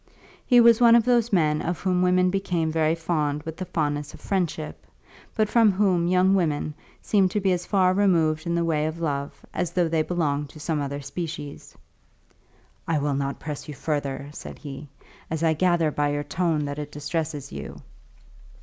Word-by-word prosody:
He 245 -2 +6
was 235 0 +6
one 235 -1 +7
of 235 -1 +4
those 240 -2 +2
men 155 -5 +2
of 170 -2 -2
whom 180 -2 +1
women 180 0 +3
become 180 -5 -1
very 160 0 +2
fond 150 -3 -1
with 160 -1 -6
the 185 - -5
fondness 145 -2 -2
of - - -15
friendship, 170 -5 -3 0.5
but 215 -2 +2
from 225 -1 +4
whom 185 -3 +2
young 185 +1 +3
women 155 -5 0 0.3
seem 195 -3 +3
to 210 +3 -1
be 190 -1 +1
as 180 -1 -1
far 185 -2 +3
removed 170 -5 +2
in 170 - 0
the 170 0 +1
way 155 -2 +1
of 160 +1 -5
love 145 -3 -3
as 175 -2 -1
though 175 0 +1
they 160 -1 +1
belonged 150 -4 -1
to 155 - -13
some 155 -1 -1
other 140 0 -4
species. 150 0 -7 1.1
"I 165 -1 +1
will 145 0 0
not 140 0 -2
press 150 0 -6
you 150 - -7
further," 140 -1 -3
said - - -9
he, 145 0 -8 0.4
"as 160 0 -2
I 160 -1 +4
gather 170 -1 +2
by 145 0 0
your 145 0 -2
tone 160 0 0
that 145 +1 -4
it 145 0 -6
distresses 150 -1 -4
you." - - -7
160 Hz, 190 wpm, -25 LUFS, 150-185 Hz, 1.1 s, one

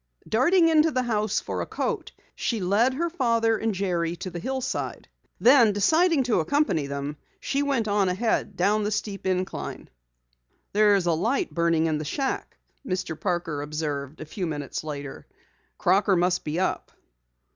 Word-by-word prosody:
Darting 330 +10 +4
into 320 0 +4
the 255 -4 0
house 215 -3 0
for - - -4
a - - -4
coat, - - -3 0.2
she 230 - -2
led 210 +8 +2
her 340 +5 0
father 230 -8 +1
and 220 -2 -1
Jerry 175 -3 -1
to 185 +1 -6
the 175 - -5
hillside. 260 +6 -3 0.3
Then, 240 -4 +6
deciding 315 - +3
to 240 -6 +1
accompany 175 - +1
them, 140 +1 -4 0.2
she 275 - -1
went 275 -6 0
on 205 -2 +2
ahead 205 +1 -1
down 200 +4 +2
the 210 - 0
steep 205 -2 -3
incline. 185 0 -3 0.8
"There's 205 -3 +4
a 170 - +2
light 235 - 0
burning 170 -1 +2
in 155 -2 0
the - - -3
shack," 265 - -3 0.3
Mr. 185 - -3
Parker 170 -5 -2
observed 150 -1 -4
a - - -5
few 180 +3 -4
minutes 145 -2 -4
later. 145 -3 -7 0.5
"Crocker 195 0 +3
must 180 +1 +1
be 155 +3 -2
up." 185 - -1
200 Hz, 160 wpm, -25 LUFS, 170-240 Hz, 0.8 s, Then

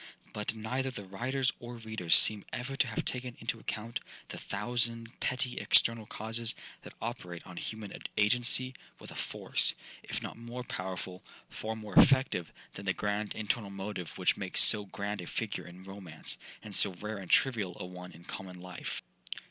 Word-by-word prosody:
But 105 +1 -3
neither 125 +5 -2
the 115 -6 -6
writers 130 +7 0
or 120 0 -7
readers 110 -7 +2
seem 105 -2 +7
ever 130 +2 -4
to 135 - +2
have 115 - -2
taken 125 -1 -2
into 115 0 -2
account 110 +2 -4 0.3
the - - -6
thousand 115 +2 -1
petty 125 0 0
external 115 -2 +4
causes 115 +2 +1 0.3
that - - -12
operate 90 -7 -5
on 90 - -10
human 110 -2 -5 0.2
agency 125 +4 +4 0.2
with - - -10
a - - -10
force, - - +4 0.3
if - - -4
not - - -6
more 120 +2 -6
powerful, 95 -3 -5 0.3
far 110 +1 -4
more 105 -2 -8
effective 130 - +5 0.2
than 100 +1 -8
the 95 - +3
grand 105 +1 -2
internal 110 0 -1
motive 100 -3 -5
which - - +2
makes - - +5
so 105 -1 +8
grand 100 0 -4
a 85 - -8
figure - - -3
in 90 +2 -11
romance, 95 -5 -5 0.2
and 105 - -8
so 100 0 +3
rare 105 +3 -5
and 95 -3 -9
trivial 110 -9 +3
a - - -4
one 90 0 -9
in 85 - -14
common 90 0 -7
life. 90 0 -6
105 Hz, 170 wpm, -32 LUFS, 95-120 Hz, 0.3 s, so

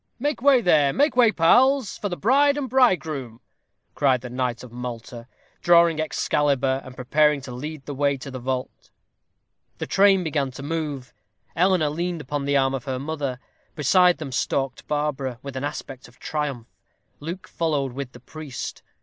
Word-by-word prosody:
"Make 290 +1 -2
way 270 -2 +5
there 155 -8 +4
make 290 0 +2
way, 240 -3 +5
pals, 255 +8 +3
for 205 - -4
the 175 - -4
bride 280 +6 +3
and 280 -2 -2
bridegroom," 160 - +1 0.5
cried 130 -4 +2
the 125 - -8
knight 125 -2 -2
of 125 - -11
Malta, 120 0 -7 0.3
drawing 170 -2 +5
Excalibur, 140 -3 0
and 130 - -11
preparing 150 +3 +2
to 130 - -9
lead 145 +3 -7
the 145 - -5
way 140 0 +1
to 135 +1 -9
the 130 - -6
vault. 130 +1 -4 0.9
The - - -4
train 195 -1 +4
began 150 -4 -1
to 135 - -9
move. 145 -4 -4 0.4
Eleanor 180 -3 +3
leaned 170 +2 -3
upon 145 +1 -4
the 140 0 +2
arm 135 0 +2
of 130 -3 -4
her 130 -2 -2
mother. 140 -2 -4 0.4
Beside 180 +4 +4
them 150 -4 -6
stalked 135 0 -2
Barbara, 145 -4 -2
with 140 -1 -7
an 130 - -4
aspect 135 -2 -6
of 120 - -21
triumph. 145 -6 -3 0.5
Luke 175 +7 -7
followed 145 -6 -1
with 135 -1 -6
the 125 - -12
priest. 150 +1 -7
145 Hz, 170 wpm, -24 LUFS, 130-170 Hz, 0.9 s, way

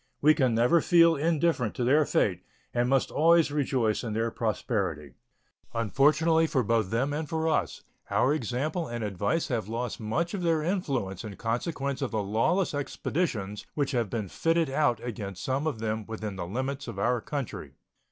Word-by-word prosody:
We 155 +2 +6
can 130 -7 +2
never 125 +9 +4
feel 170 -2 +5
indifferent 160 -6 +1
to 125 - -1
their 145 +5 +4
fate, 90 -3 +1 0.3
and 120 0 +1
must 135 -1 +2
always 165 -1 +4
rejoice 130 -7 0
in 115 -3 -3
their 115 +1 0
prosperity. 95 - -2 0.6
Unfortunately 155 +8 +3
both - - -5 0.2
for 115 -1 +3
them 115 +8 -1
and 155 0 -3
for 160 0 -1
us, 160 - -1 0.3
our 135 - +3
example 150 - -2
and 120 -1 -4
advice 105 - -1
have 115 -6 -1
lost 120 +3 -3
much 135 - -1
of 200 - -3
their 165 -3 +1
influence 135 - -2
in 105 -3 -7
consequence 135 - -2
of 135 - -1
the 110 -2 -1
lawless 115 - +1
expeditions 135 - -3
which 145 -2 0
have 120 -6 0
been 105 -1 -3
fitted 165 - +1
out 135 -5 +2
against 100 -5 -5
some 135 +4 -1
of 150 - -2
them 110 -1 -3
within 110 -2 -5
the 90 -2 -5
limits 130 +7 -3
of 115 -4 -6
our 120 +4 +1
country. 125 - -5
125 Hz, 175 wpm, -28 LUFS, 110-155 Hz, 0.6 s, We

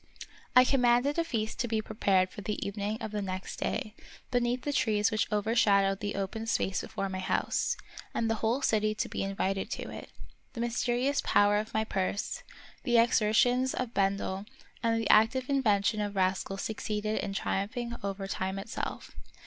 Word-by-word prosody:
I 250 - +9
commanded 250 +3 +3
a - - +3
feast 225 -8 -3
to 240 - 0
be 220 -1 0
prepared 195 -4 +1
for 205 - -8
the 210 +1 -3
evening 205 +1 -2
of 220 - -4
the 210 -1 -2
next 185 -1 -5
day, 215 - -2 0.4
beneath 245 0 +1
the 290 - -1
trees 210 -5 +2
which 215 0 0
overshadowed 200 -2 +3
the 205 0 -3
open 200 +3 -3
space 195 -4 0
before 195 - -3
my 190 -1 -4
house, 185 - 0 0.3
and 230 - -1
the 225 - +2
whole 235 +5 +1
city 215 -2 +2
to - - -1
be - - -4
invited 195 0 -1
to - - -5
it. - - -8 0.4
The 230 - -4
mys 240 0 -1
terious 250 +4 +1
power 205 0 +4
of 215 +1 -3
my 220 - +2
purse, 195 -1 -2 0.4
the 240 -2 +2
exertions 240 +3 +3
of 250 -2 -3
Ben 195 0 +2
del, 195 +1 -4 0.3
and 230 -1 +2
the 225 - -2
active 250 +4 +4
invention 215 -5 +2
of 205 -1 -3
Rascal 190 +1 0
succeeded 215 +1 -2
in 195 - -3
triumphing 235 +6 -2
over 195 0 -3
time 190 0 -2
itself. 200 +3 -5
215 Hz, 180 wpm, -30 LUFS, 195-235 Hz, 0.4 s, I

